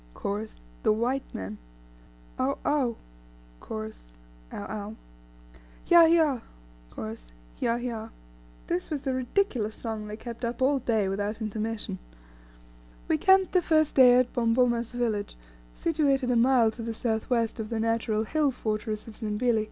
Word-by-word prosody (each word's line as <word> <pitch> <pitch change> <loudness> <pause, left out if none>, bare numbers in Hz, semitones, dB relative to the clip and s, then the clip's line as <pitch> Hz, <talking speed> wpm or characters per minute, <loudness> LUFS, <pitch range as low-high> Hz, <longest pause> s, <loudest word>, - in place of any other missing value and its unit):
Chorus. 210 +2 -4 0.2
The - - +3
White 245 +5 -1
Man. 95 +3 -6 0.8
Ough! 265 +2 +1
Ough! 270 -6 +1 0.6
Chorus. - - -8 0.3
Ough! 205 - -6
Ough! 210 0 -5 0.9
Hyah! 340 -1 +8
Hyah! 310 -7 +3 0.5
Chorus. 110 - -8 0.3
Hyah. 235 0 +1
Hyah!" 230 -2 -4 0.6
This 180 - -2
was 295 -3 -3
the 265 - -1
ridiculous 255 - 0
song 220 -2 -5
they 210 0 -6
kept 235 +1 -8
up 235 +1 -2
all 270 +2 +3
day 225 -5 +1
without 205 +3 -2
intermission. 215 - -3 1.1
We - - +2
camped 380 0 +5
the 365 - +4
first 310 -3 +2
day 250 -2 +7
at 250 -1 +2
Bomboma's 235 0 +2
village, 225 - -2 0.3
situated 280 -6 +1
a - - +2
mile 235 -1 +4
to 230 - -9
the 230 0 -4
south 220 -2 -2
west 230 -2 0
of 215 -1 -4
the 230 -1 -2
natural 225 -1 0
hill 300 +5 +1
fortress 215 -3 -3
of 220 - -10
Zimbili. 225 +1 +1
230 Hz, 145 wpm, -27 LUFS, 215-255 Hz, 1.1 s, Hyah